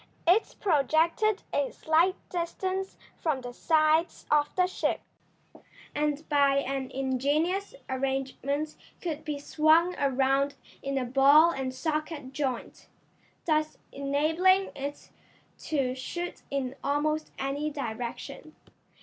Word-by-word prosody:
It 380 Hz, +6 st, +3 dB
projected 335 Hz, +5 st, +2 dB
a 285 Hz, -2 st, +1 dB
slight 330 Hz, +4 st, +2 dB, 0.2 s
distance 375 Hz, +2 st, -3 dB, 0.2 s
from 300 Hz, -5 st, 0 dB
the 245 Hz, -1 st, -7 dB
sides 315 Hz, +4 st, +2 dB
of 295 Hz, -1 st, +4 dB
the 365 Hz, -, +4 dB
ship, 365 Hz, -, -1 dB, 0.9 s
and 300 Hz, +1 st, -1 dB
by 280 Hz, -2 st, +4 dB
an 270 Hz, -1 st, -1 dB
ingenious 290 Hz, -, 0 dB
arrangement 270 Hz, +3 st, -2 dB, 0.2 s
could 320 Hz, -4 st, -4 dB
be 300 Hz, -2 st, -3 dB
swung 315 Hz, +4 st, +3 dB
around 275 Hz, +1 st, +2 dB, 0.3 s
in 275 Hz, 0 st, -2 dB
a 260 Hz, -, 0 dB
ball 280 Hz, +6 st, +6 dB
and 265 Hz, -4 st, -3 dB
socket 300 Hz, 0 st, -3 dB
joint, 265 Hz, -4 st, -3 dB, 0.6 s
thus 310 Hz, -2 st, +1 dB
enabling 320 Hz, +8 st, +2 dB
it 280 Hz, +1 st, -6 dB, 0.5 s
to 270 Hz, -5 st, 0 dB
shoot 345 Hz, +7 st, -5 dB
in 270 Hz, -2 st, -2 dB
almost 305 Hz, +2 st, 0 dB
any 280 Hz, +3 st, -2 dB
direction. 275 Hz, +2 st, -6 dB
295 Hz, 110 wpm, -28 LUFS, 270-320 Hz, 0.9 s, ball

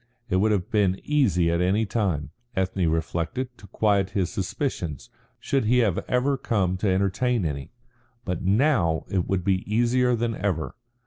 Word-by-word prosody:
It 95 Hz, -, +3 dB
would 105 Hz, +3 st, +3 dB
have 95 Hz, -4 st, -1 dB
been 100 Hz, -3 st, +2 dB
easy 100 Hz, -, +2 dB
at 85 Hz, +1 st, +1 dB
any 100 Hz, +5 st, +2 dB
time, 95 Hz, -9 st, -1 dB, 0.2 s
Ethne 95 Hz, -2 st, 0 dB
reflected, 85 Hz, -, -2 dB
to 100 Hz, -, -13 dB
quiet 100 Hz, -3 st, +1 dB
his 90 Hz, -3 st, 0 dB
suspicions, 90 Hz, -, -3 dB, 0.3 s
should 135 Hz, -4 st, 0 dB
he 120 Hz, +4 st, +3 dB
have 105 Hz, -8 st, +2 dB
ever 135 Hz, +3 st, +2 dB
come 95 Hz, -8 st, 0 dB
to 100 Hz, +1 st, 0 dB
entertain 100 Hz, +4 st, +1 dB
any. 70 Hz, +1 st, -4 dB, 0.5 s
But 90 Hz, -3 st, -2 dB
now 100 Hz, -, +2 dB
it 95 Hz, -3 st, 0 dB
would 95 Hz, -2 st, 0 dB
be 95 Hz, -1 st, +1 dB
easier 120 Hz, +2 st, +3 dB
than 115 Hz, 0 st, -1 dB
ever. 95 Hz, -6 st, -2 dB
100 Hz, 165 wpm, -25 LUFS, 90-120 Hz, 0.5 s, It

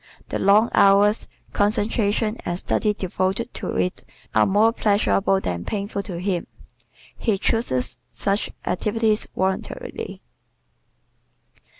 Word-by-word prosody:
The -, -, -2 dB
long 210 Hz, +4 st, +4 dB
hours, 200 Hz, +2 st, +4 dB, 0.3 s
concentration 215 Hz, +1 st, +1 dB
and 175 Hz, 0 st, -2 dB
study 210 Hz, +2 st, 0 dB
devoted 190 Hz, +5 st, -2 dB
to -, -, -4 dB
it 180 Hz, -, -1 dB, 0.3 s
are -, -, +4 dB
more 210 Hz, +3 st, +4 dB
pleasurable 200 Hz, -2 st, +2 dB
than 85 Hz, -, -3 dB
painful 200 Hz, -1 st, -3 dB
to 185 Hz, -3 st, -5 dB
him. 180 Hz, -2 st, -2 dB, 0.7 s
He 220 Hz, -4 st, 0 dB
chooses 190 Hz, -, 0 dB
such 200 Hz, +1 st, -1 dB, 0.2 s
activities 215 Hz, +3 st, +1 dB
voluntarily. 190 Hz, 0 st, -3 dB
200 Hz, 105 wpm, -23 LUFS, 190-215 Hz, 0.7 s, long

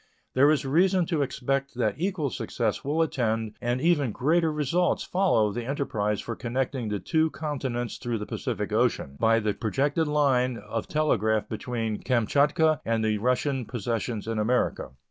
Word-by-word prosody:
There 140 Hz, +3 st, +5 dB
is 150 Hz, -2 st, +2 dB
reason 180 Hz, +6 st, +3 dB
to 160 Hz, -3 st, 0 dB
expect 135 Hz, 0 st, -2 dB
that 110 Hz, -4 st, +1 dB
equal 170 Hz, -5 st, -1 dB
success 115 Hz, -4 st, -2 dB
will 155 Hz, +4 st, +1 dB
attend 115 Hz, -7 st, -1 dB
and 120 Hz, +1 st, 0 dB
even 145 Hz, -5 st, +2 dB
greater 160 Hz, +7 st, +2 dB
results 150 Hz, +4 st, +1 dB
follow 175 Hz, -, +2 dB
the 120 Hz, +2 st, -4 dB
enterprise 105 Hz, -7 st, -1 dB
for 115 Hz, -, -5 dB
connecting 125 Hz, -1 st, -2 dB
the 105 Hz, -, -1 dB
two 160 Hz, +9 st, +1 dB
continents 135 Hz, -5 st, -4 dB
through 120 Hz, -2 st, -2 dB
the 105 Hz, -, -5 dB
Pacific -, -, -3 dB
Ocean 70 Hz, -, +1 dB
by 115 Hz, 0 st, +4 dB
the 105 Hz, -2 st, 0 dB
projected 140 Hz, +9 st, 0 dB
line 130 Hz, -4 st, +2 dB
of 110 Hz, +2 st, -5 dB
telegraph 110 Hz, -8 st, +1 dB
between 115 Hz, -1 st, -3 dB
Kamchatka 140 Hz, +5 st, +2 dB
and 115 Hz, -1 st, 0 dB
the 105 Hz, -1 st, +1 dB
Russian 125 Hz, +2 st, 0 dB
possessions 115 Hz, -1 st, -3 dB
in 115 Hz, -1 st, -1 dB
America. 120 Hz, +4 st, 0 dB
125 Hz, 160 wpm, -27 LUFS, 115-150 Hz, -, There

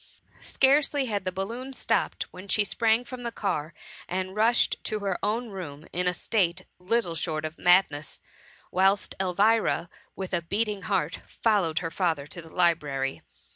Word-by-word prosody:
Scarcely 280 Hz, +1 st, +3 dB
had 205 Hz, -5 st, -2 dB
the 185 Hz, -, 0 dB
balloon 230 Hz, +8 st, -4 dB
stopped -, -, 0 dB
when 185 Hz, +2 st, -10 dB
she 210 Hz, +2 st, +3 dB
sprang 220 Hz, +4 st, +2 dB
from 255 Hz, 0 st, -7 dB
the 235 Hz, -1 st, -3 dB
car, 160 Hz, -8 st, -2 dB, 0.4 s
and 185 Hz, +1 st, -3 dB
rushed 230 Hz, +3 st, +3 dB
to 215 Hz, -, -1 dB
her 195 Hz, -3 st, -2 dB
own 225 Hz, +4 st, 0 dB
room 165 Hz, -7 st, -7 dB
in 180 Hz, +1 st, 0 dB
a -, -, +4 dB
state 180 Hz, -3 st, 0 dB
little 185 Hz, 0 st, 0 dB
short 155 Hz, -1 st, -2 dB
of 155 Hz, +2 st, -6 dB
madness, 175 Hz, -5 st, +3 dB, 0.5 s
whilst 195 Hz, +2 st, +2 dB
Elvira, 195 Hz, -1 st, +2 dB, 0.3 s
with 190 Hz, -1 st, -5 dB
a 175 Hz, -, +2 dB
beating 205 Hz, +3 st, -1 dB
heart 180 Hz, -5 st, -1 dB
followed 195 Hz, -8 st, +1 dB
her 165 Hz, -, -2 dB
father 165 Hz, -7 st, 0 dB
to 160 Hz, +4 st, -8 dB
the 165 Hz, -, -13 dB
library. 150 Hz, -6 st, 0 dB
190 Hz, 160 wpm, -27 LUFS, 170-220 Hz, 0.5 s, a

